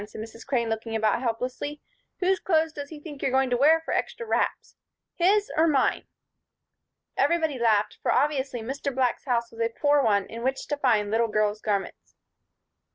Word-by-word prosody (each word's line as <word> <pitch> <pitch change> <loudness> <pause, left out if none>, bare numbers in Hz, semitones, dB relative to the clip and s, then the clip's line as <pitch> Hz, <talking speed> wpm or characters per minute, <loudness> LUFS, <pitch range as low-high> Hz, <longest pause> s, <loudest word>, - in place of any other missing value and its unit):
said 215 - -10
Mrs. 225 +1 -9
Crane, 245 -4 0
looking 225 0 -3
about 220 +1 +1
helplessly. 255 +5 -3 0.4
"Whose 375 +1 +2
clothes 320 -3 +1
does 285 -1 -7
he 310 - -9
think 295 -2 -10
you're - - +1
going 265 0 +1
to - - +3
wear 300 +6 +5
for - - -4
'extra 465 - -2
wraps'? - - -1 0.4
His, 405 +4 +2
or 320 +2 +4
mine?" 280 -4 +1 1.1
Everybody 320 -6 +1
laughed, 215 -3 +2
for - - +1
obviously 275 -4 0
Mr. 275 +4 -3
Black's 255 -2 0
house 235 -3 0
was 230 0 -8
a 230 - +2
poor 290 +4 +2
one 205 -5 +2
in 230 +1 -8
which 265 +2 -1
to 290 - -1
find 220 -7 +2
little 230 +1 +2
girls' 215 -1 0
garments. 200 -2 -3
260 Hz, 180 wpm, -26 LUFS, 225-295 Hz, 1.1 s, wear